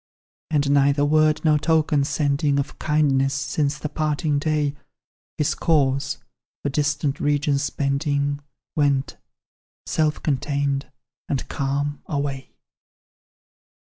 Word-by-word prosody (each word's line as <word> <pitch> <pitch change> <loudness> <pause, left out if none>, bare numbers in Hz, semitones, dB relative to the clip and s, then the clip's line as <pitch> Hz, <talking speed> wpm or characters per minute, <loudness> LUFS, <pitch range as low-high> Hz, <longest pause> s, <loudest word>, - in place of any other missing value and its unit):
"And 145 -2 +1
neither 140 0 +4
word 155 +1 +3
nor 150 -1 +4
token 155 -2 +2
sending, 140 -1 +1
Of 140 - -3
kindness, 140 -3 +2
since 145 +1 -1
the 150 - -4
parting 150 0 0
day, 150 -1 0 0.6
His 150 - +1
course, 140 -4 +1 0.5
for 145 - 0
distant 145 0 0
regions 145 0 +1
bending, 140 0 0 0.4
Went, 140 -3 +1 0.7
self 155 -1 0
contained 140 -1 -1 0.4
and 135 - -2
calm, 140 +1 -2
away. 140 -2 -3
145 Hz, 105 wpm, -23 LUFS, 140-150 Hz, 0.7 s, neither